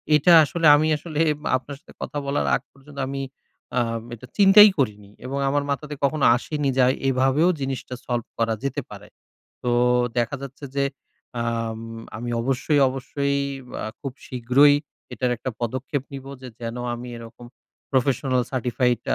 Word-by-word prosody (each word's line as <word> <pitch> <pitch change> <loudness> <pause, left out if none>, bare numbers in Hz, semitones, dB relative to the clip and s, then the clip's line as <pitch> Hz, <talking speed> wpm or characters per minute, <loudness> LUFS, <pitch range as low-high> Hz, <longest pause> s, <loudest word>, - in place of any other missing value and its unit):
এটা 150 +4 +4
আসলে 165 +3 -1
আমি 155 +2 +2
আসলে 155 0 -5 0.4
আপনার 140 +2 -9
সাথে - - -18
কথা - - -4
বলার 140 +1 0
আগ - - -2
পর্যন্ত, 140 +1 -13
আমি 135 0 -3 0.6
আ - - +3 0.3
এটা 120 +3 -13
চিন্তাই 205 +1 +9
করিনি। 105 -6 -1 0.2
এবং 135 +2 -3
আমার 145 +1 +1
মাথাতে 150 +1 -3
কখনো 140 0 +2
আসেনি, 145 +3 -2
যে 130 - +5 0.3
এভাবেও 135 +6 +3
জিনিসটা 135 -1 -4
solve 120 -2 -2
করা 115 -1 +1
যেতে 140 -1 -2
পারে। - - -11 0.6
তো 125 - 0 0.5
দেখা 120 +4 0
যাচ্ছে 140 +1 -9
যে, 140 - +2 0.6
আম 115 -1 -2 0.4
আমি 120 +2 -5
অবশ্যই, 135 +4 +1
অবশ্যই 140 +2 -2 0.5
আ - - -3
খুব 135 -3 -5
শীঘ্রই 130 +4 +4 0.4
এটার 125 -1 -1
একটা 130 +3 -4
পদক্ষেপ 130 +4 -2
নিব। 135 -1 -7 0.2
যে 130 - -7
যেন 115 0 -5 0.2
আমি 120 +1 -8
এরকম 115 +1 -11 0.4
Professional 130 -1 +1
Certified 125 -1 0
135 Hz, 150 wpm, -23 LUFS, 120-145 Hz, 0.6 s, চিন্তাই